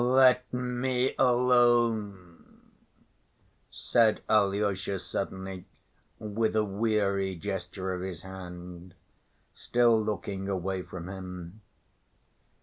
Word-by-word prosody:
"Let 125 Hz, 0 st, +4 dB
me 125 Hz, +1 st, -1 dB
alone," 120 Hz, -7 st, +2 dB, 1.1 s
said 115 Hz, -2 st, +2 dB
Alyosha 100 Hz, -2 st, +1 dB
suddenly, 95 Hz, 0 st, -5 dB, 0.5 s
with 110 Hz, +1 st, -1 dB
a 110 Hz, -, +3 dB
weary 100 Hz, -2 st, 0 dB
gesture 95 Hz, 0 st, -4 dB
of 90 Hz, -, -4 dB
his 90 Hz, -3 st, -6 dB
hand, 90 Hz, -1 st, -9 dB, 0.6 s
still 120 Hz, -2 st, +3 dB
looking 100 Hz, -2 st, -3 dB
away 95 Hz, 0 st, -2 dB
from 90 Hz, -1 st, -8 dB
him. 90 Hz, +1 st, -8 dB
100 Hz, 85 wpm, -29 LUFS, 95-115 Hz, 1.1 s, Let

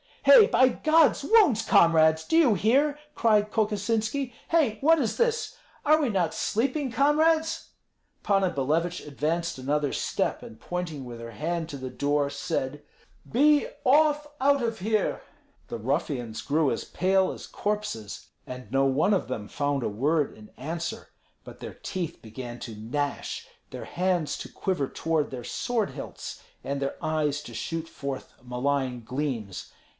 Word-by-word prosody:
"Hei, 465 Hz, -4 st, +9 dB
by 260 Hz, -, +5 dB
God's 310 Hz, +2 st, +3 dB
wounds, 355 Hz, -, +5 dB
comrades, 160 Hz, -4 st, +5 dB
do 325 Hz, -, +1 dB
you 295 Hz, -9 st, +6 dB
hear?" 270 Hz, -, +2 dB, 0.2 s
cried 210 Hz, -2 st, +3 dB
Kokosinski. 220 Hz, +4 st, 0 dB, 0.2 s
"Hei, 290 Hz, -10 st, +2 dB
what 325 Hz, +3 st, +5 dB
is 240 Hz, -6 st, -1 dB
this? 470 Hz, -1 st, 0 dB, 0.3 s
Are 310 Hz, +1 st, +5 dB
we 280 Hz, -, +1 dB
not 180 Hz, -6 st, 0 dB
sleeping, 260 Hz, +4 st, -1 dB
comrades?" 315 Hz, +5 st, +2 dB, 0.5 s
Panna 195 Hz, -2 st, +2 dB
Billevich 165 Hz, +5 st, -1 dB
advanced 160 Hz, +4 st, -2 dB
another 145 Hz, +2 st, 0 dB
step, -, -, -1 dB
and 110 Hz, -, -11 dB
pointing 170 Hz, -5 st, -4 dB
with 120 Hz, -1 st, -8 dB
her 115 Hz, 0 st, -8 dB
hand 165 Hz, +8 st, -3 dB
to 140 Hz, -, -6 dB
the 130 Hz, -1 st, -6 dB
door, 145 Hz, +2 st, 0 dB
said, 145 Hz, -2 st, -3 dB, 0.5 s
"Be 295 Hz, +4 st, +4 dB, 0.2 s
off 295 Hz, +2 st, +4 dB
out 280 Hz, 0 st, +3 dB
of 230 Hz, -1 st, -2 dB
here!" 215 Hz, +2 st, 0 dB, 0.5 s
The -, -, -5 dB
ruffians 125 Hz, -2 st, -2 dB
grew 150 Hz, -1 st, +2 dB
as -, -, -2 dB
pale 190 Hz, +1 st, +1 dB
as -, -, -8 dB
corpses, 205 Hz, -, -4 dB, 0.2 s
and 125 Hz, 0 st, -8 dB
no 135 Hz, 0 st, +3 dB
one 140 Hz, +9 st, +2 dB
of 195 Hz, -, 0 dB
them 110 Hz, -5 st, -4 dB
found 145 Hz, +1 st, -1 dB
a -, -, 0 dB
word 145 Hz, +8 st, 0 dB
in 105 Hz, 0 st, -14 dB
answer. 165 Hz, +2 st, -5 dB, 0.3 s
But -, -, -12 dB
their -, -, -8 dB
teeth 180 Hz, -4 st, -5 dB
began 120 Hz, +2 st, -8 dB
to 115 Hz, -, -7 dB
gnash, 140 Hz, +7 st, -3 dB, 0.2 s
their -, -, -7 dB
hands 180 Hz, -3 st, -1 dB
to -, -, -7 dB
quiver 180 Hz, -8 st, -1 dB
toward 160 Hz, 0 st, -1 dB
their 125 Hz, -2 st, -6 dB
sword 225 Hz, -, -1 dB
hilts, -, -, -8 dB, 0.2 s
and 140 Hz, +2 st, -3 dB
their 140 Hz, 0 st, -2 dB
eyes 150 Hz, -2 st, 0 dB
to -, -, -10 dB
shoot 165 Hz, 0 st, -4 dB
forth 140 Hz, -4 st, -6 dB
malign 125 Hz, 0 st, -1 dB
gleams. 120 Hz, -7 st, -4 dB
165 Hz, 155 wpm, -27 LUFS, 140-230 Hz, 0.5 s, Hei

